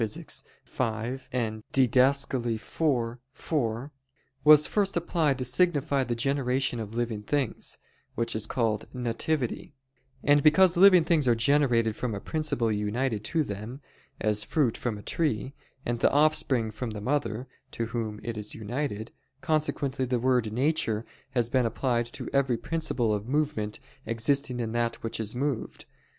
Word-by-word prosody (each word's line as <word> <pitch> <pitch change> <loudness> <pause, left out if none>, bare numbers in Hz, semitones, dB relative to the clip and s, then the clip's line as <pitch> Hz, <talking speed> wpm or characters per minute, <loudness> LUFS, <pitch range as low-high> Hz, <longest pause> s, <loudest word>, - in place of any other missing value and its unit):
v, 115 +2 -3 0.5
Did. 130 -3 +2
iv, 130 -3 +2
4), 125 -1 -2 0.5
was 150 0 +8
first 195 -3 0
applied 160 -5 +1
to 130 - -2
signify 145 0 +2
the 120 -2 -2
generation 130 0 0
of 110 0 -6
living 115 -3 -2
things, 135 +2 -2 0.4
which 115 0 -1
is 110 - -1
called 110 -4 -1
"nativity": 125 +3 -2 0.5
and 145 0 +5
because 170 +5 +5
living 185 -1 +7
things 160 -5 +2
are 120 - +5
generated 115 -3 +2
from 115 -2 -3
a - - -4
principle 155 -5 0
united 105 +2 -1
to 160 +6 +1
them, 105 +4 -6 0.4
as 105 0 +1
fruit 140 -8 +1
from 115 -4 -3
a 105 - -11
tree, 135 -5 -1 0.3
and 120 0 -1
the - - +4
offspring 140 -6 +2
from 115 +3 -5
the 105 -1 -6
mother, 130 -1 -1 0.2
to 115 - -3
whom 115 -2 -4
it 115 -2 -4
is 105 - -5
united, 110 0 -4 0.3
consequently 145 -4 0
the 125 0 0
word 125 -3 +1
"nature" 120 -3 0 0.3
has 120 -2 +2
been 125 -1 +2
applied 120 0 0
to 120 - -7
every 135 -3 +2
principle 130 -7 -1
of 105 +1 -3
movement 140 -8 -1 0.3
existing 125 +3 +1
in 115 -2 -2
that 115 0 -1
which 115 - -3
is 110 +1 -4
moved. 135 -2 -3
125 Hz, 145 wpm, -28 LUFS, 115-145 Hz, 0.5 s, was